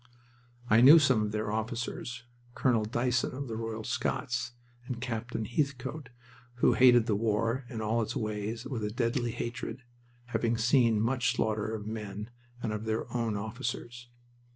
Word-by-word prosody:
I 110 +1 +5
knew 140 +6 +10
some 135 -8 +4
of 105 0 -1
their 105 0 -2
officers 115 +2 -3 0.3
Colonel 115 -5 +2
Dyson 125 +3 0
of 140 +1 -4
the 115 - -4
Royal 115 -1 -4
Scots, 125 +1 -2 0.3
and 125 -3 -4
Captain 120 -2 -3
Heathcote, 135 +1 -2 0.5
who 125 - +4
hated 120 -2 +6
the 110 - +1
war 115 +4 0
and 115 -3 -4
all 115 +2 +1
its 110 - -3
ways 110 +2 -3
with 120 -6 -4
a 105 - -1
deadly 120 +1 0
hatred, 120 +1 -5 0.4
having 115 -1 0
seen 115 -1 +4
much 120 +1 +1
slaughter 110 -1 0
of 105 -1 -6
men 105 0 -6 0.3
and 110 -2 -1
of 105 +1 -4
their 110 +2 -2
own 115 -3 0
officers. 120 +2 -5
115 Hz, 155 wpm, -30 LUFS, 110-125 Hz, 0.5 s, knew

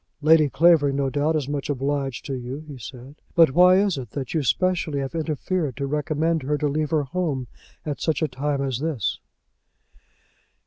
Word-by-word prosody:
"Lady 155 -1 +5
Clavering, 145 +1 +4
no 135 -1 0
doubt, 150 +3 +1
is 150 -4 -1
much 145 0 -3
obliged 135 -3 -2
to 135 - -4
you," 130 +4 -6
he 145 - -8
said, 130 +5 -11
"but 165 -5 +6
why 180 +5 +6
is 195 -6 +2
it 125 - -7
that 135 -4 -5
you 160 - +1
specially 155 - 0
have 135 +1 -3
interfered 160 -2 -2
to 140 - -2
recommend 155 +3 0
her 145 +3 -1
to 150 - 0
leave 150 +1 -1
her 155 -3 +1
home 140 -3 -2 0.4
at 150 -2 -4
such 160 -2 0
a - - +2
time 140 +1 -2
as 130 -3 -2
this?" 145 -9 -2
145 Hz, 185 wpm, -24 LUFS, 135-160 Hz, 0.4 s, but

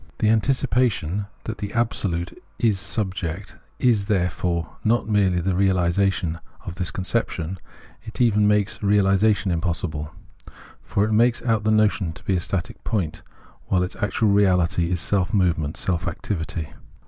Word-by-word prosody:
The 105 - +2
anticipation 115 - +1 0.2
that 110 -1 -5
the 100 -1 -4
Absolute 100 -7 -1 0.2
is 110 -5 +2
subject 95 -2 -4 0.2
is 110 -6 +2
therefore 90 -3 -1
not 115 +1 +2
merely 100 -4 +2
not 90 -1 -1
the 95 - +1
realisation 90 -2 +1 0.3
of - - -5
this 90 0 -3
con 95 - -5
ception; 95 -4 -2 0.4
it 110 - -10
even 105 -4 +4
makes 105 -1 +1
reahsation 100 0 +3
impossible. 85 -3 -2 0.7
For 100 - 0
it 110 - -2
makes 115 +2 +3
out 110 -3 +1
the - - +3
notion 105 -5 +2
to - - -14
be 95 - 0
a - - +1
static 90 +1 -3
point, 90 -8 -2 0.5
while 90 -1 +2
its 90 - -4
actual 105 0 +1
reahty 90 -3 +3
is 90 -1 0
self 100 +3 0
movement, 80 -6 +1
self 90 -3 -1
activity. 80 -4 -4
95 Hz, 150 wpm, -23 LUFS, 90-105 Hz, 0.7 s, even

